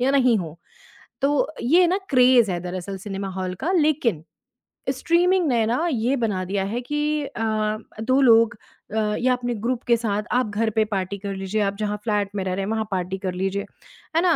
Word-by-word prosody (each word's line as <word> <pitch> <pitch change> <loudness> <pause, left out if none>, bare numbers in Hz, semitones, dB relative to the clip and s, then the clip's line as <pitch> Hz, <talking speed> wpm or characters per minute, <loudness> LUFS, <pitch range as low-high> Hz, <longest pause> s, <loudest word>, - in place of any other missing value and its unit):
या 255 +2 +2
नहीं 255 -4 +4
हो। 165 -3 -6 0.6
तो 290 +2 +1
ये 320 +10 +4
है 360 - +6
ना 370 +3 +1
क्रेज़ 250 -5 +5
है 175 -1 -2
दरअसल 180 +2 -5
सिनेमा 195 -1 -5
हॉल 185 -1 -3
का। 355 - +1
लेकिन 290 - +1 0.7
स्ट्रीमिंग 355 +1 +2
ने 235 -5 +2
ना 245 +9 0
ये 245 +1 +1
बना 195 -5 0
दिया 195 +1 -1
है 235 +5 -3
कि 295 +3 -1
अ, 215 -4 -1 0.2
दो 260 +4 +2
लोग 230 -4 +5 0.4
अ, 210 -1 +1
या 255 +1 +3
अपने 245 -1 -2
ग्रुप 235 +3 -2
के 235 - +4
साथ 210 -2 -1
आप 250 -3 +1
घर 220 +2 0
पर 220 0 +1
पार्टी 195 0 -2
कर 200 0 -5
लीजिए, 195 +3 -2
आप 200 -1 0
जहाँ 210 -1 -1
फ्लैट 210 -2 0
में 195 - -1
रह 185 - -2
रहे 195 +1 -2
हैं 215 - -3
वहाँ 220 -1 -1
पार्टी 185 0 -2
कर 185 -1 -3
लीजिए। 195 +2 -2 0.5
है 330 - +4
ना? 355 -3 +4
220 Hz, 210 wpm, -23 LUFS, 195-255 Hz, 0.7 s, है